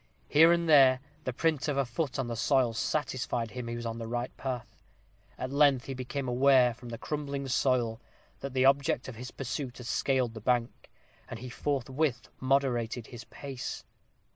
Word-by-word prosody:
Here 160 +3 +7
and 170 -1 +2
there, 135 -4 +7 0.3
the 130 - 0
print 155 +3 0
of 145 -2 0
a 140 - +2
foot 130 +3 -3
on 135 - -1
the 120 -1 -4
soil 125 0 +2
satisfied 120 -3 -2
him 125 0 -6
he 120 - -3
was 120 0 -5
in 115 0 -4
the 115 - -5
right 120 +2 -3
path. 125 -4 -5 0.6
At 130 - -4
length 140 -3 +4
he 135 - -4
became 130 +1 -4
aware, 125 0 +5
from 120 +1 -11
the 115 - -5
crumbling 140 0 -4
soil, 120 -2 +1 0.4
that 140 -1 -6
the 130 0 +4
object 135 -2 +3
of 130 - -6
his 125 +3 -7
pursuit 135 -1 -5
had 125 - -9
scaled 130 -1 +1
the 110 - -8
bank, 120 +1 -1 0.4
and 120 - -6
he 125 +2 -8
forthwith 135 0 -1
moderated 125 -4 +1
his 120 -1 -8
pace. 135 -3 -6
130 Hz, 185 wpm, -30 LUFS, 120-140 Hz, 0.6 s, Here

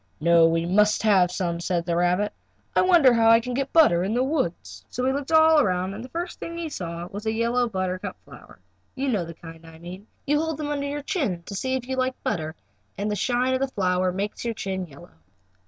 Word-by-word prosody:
"No, 170 +1 +5
we 165 0 0
must 210 +5 +2
have 195 -5 +4
some," 175 -2 -2
said 170 -1 -1
the 170 - -1
rabbit. 180 +4 +1 0.4
"I - - +5
wonder 340 -9 +5
how 225 -1 +4
I 230 0 +7
can 250 +2 -5
get 275 +2 -2
butter 240 - +5
in 205 +4 -1
the 250 - +2
woods?" 265 - -3
So 250 - -3
he 265 - +2
looked 280 +2 -4
all 315 0 +6
around 185 -6 0
and 215 +3 -7
the 255 - -10
first 345 +4 -5
thing 335 0 -6
he 335 -2 -4
saw 170 - -5
was 205 +3 -7
a - - +2
yellow 235 +2 0
buttercup 185 -2 -3
flower. - - -15 0.4
You 270 +1 -1
know 205 -8 0
the 165 0 -9
kind 165 -1 -12
I 165 0 -13
mean. 180 +5 -10 0.2
You 295 +1 +2
hold 320 -1 -2
them 300 -1 -4
under 285 -1 -2
your 290 0 -4
chin 245 - -2
to 200 - -9
see 260 +6 -1
if 250 -1 -4
you 260 0 -3
like 255 0 0
butter, 160 -1 -2 0.4
and 205 +1 -2
the - - -1
shine 250 +4 0
of 260 - +1
the 270 - 0
flower 185 -5 0
makes 200 +3 -4
your 230 -1 -2
chin 190 -3 -4
yellow. 150 +3 -15
210 Hz, 235 wpm, -24 LUFS, 180-265 Hz, 0.4 s, I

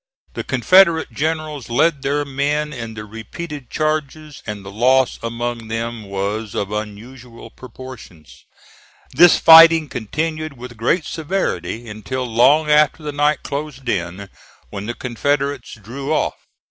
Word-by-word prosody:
The - - -4
Confederate 175 -4 +4
generals 155 -3 -3
led 150 +4 +2
their 145 +2 -1
men 145 +2 -1
in 115 -4 -7
the 105 0 -7
repeated 125 +6 -8
charges, 155 -1 -3
and 105 -2 -6
the 95 - -8
loss 130 +4 +2
among 115 0 -4
them 115 0 -4
was 100 +2 -4
of 100 0 -2
unusual 115 +3 -8
proportions. 125 - -13 0.7
This 175 -1 +7
fighting 165 -1 +8
continued 155 +5 -4
with 120 0 -9
great 135 +9 0
severity 155 -9 -3
until 115 +5 -5
long 130 +7 +4
after 150 +1 +3
the 150 - -3
night 145 +1 +1
closed 140 -2 -6
in, 95 -1 -3 0.4
when 100 +1 -6
the 120 - -4
Confederates 140 +2 -2
drew 135 +8 -6
off. 155 - +1
130 Hz, 135 wpm, -19 LUFS, 115-150 Hz, 0.7 s, fighting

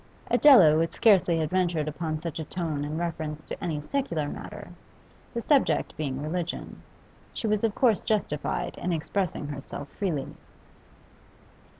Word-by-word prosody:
Adela 205 - +8
would 165 +1 0
scarcely 190 -6 +4
have 155 -1 -1
ventured 175 -4 +1
upon 155 +1 -3
such 165 -1 -5
a - - -2
tone 155 -3 -3
in 150 +2 -3
reference 155 -3 -3
to - - -7
any 160 -4 -1
secular 170 - -2
matter; - - -8 0.7
the 235 - -2
subject 285 -3 +2
being 140 -2 -3
religion, 170 +2 -4 0.5
she - - -4
was 215 -1 +1
of 220 -2 +1
course 235 -6 +3
justified 195 -9 -1
in 180 - -2
expressing 165 -1 -2
herself 140 0 -7
freely. 160 -9 -3
165 Hz, 140 wpm, -27 LUFS, 150-195 Hz, 0.7 s, Adela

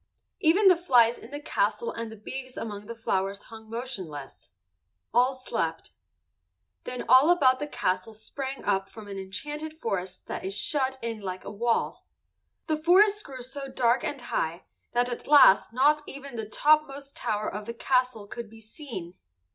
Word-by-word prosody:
Even 385 +4 +5
the 370 - +8
flies 245 -9 +4
in 230 - -12
the 290 +1 -6
castle 470 +9 0
and 230 -1 -5
the - - -8
bees 255 +4 -7
among 205 -2 -6
the 235 - -6
flowers 195 -3 -1
hung 220 -1 -12
motionless. 190 - -6 0.6
All 250 +3 +4
slept. 260 0 -3 0.9
Then 250 -1 -5
all 265 +5 +7
about 260 -7 +5
the 295 - -3
castle 220 -5 -2
sprang 265 +5 -6
up 195 0 +1
an 215 -2 -9
enchanted 295 +12 -5
forest 190 - -3
that 190 - -4
shut 265 +5 0
it - - -1
in 225 -1 -4
like 185 -1 -5
a - - -6
wall. 230 +3 -1 0.6
The 310 -2 0
forest 400 +6 +5
grew 260 -3 -8
so 275 +2 -6
dark 245 -1 +2
and 285 - -3
high 170 -8 -2 0.3
that 245 0 +2
at 245 -1 -6
last 285 -10 +7
not 290 +5 +4
even 275 -2 -8
the 220 -2 -5
top 305 +6 +4
most 275 0 -9
tower 210 0 -2
of 210 +1 -5
the 235 - -4
castle 250 -3 +1
could 225 +2 -7
be 225 +1 -14
seen. 220 - -8
245 Hz, 170 wpm, -27 LUFS, 210-280 Hz, 0.9 s, the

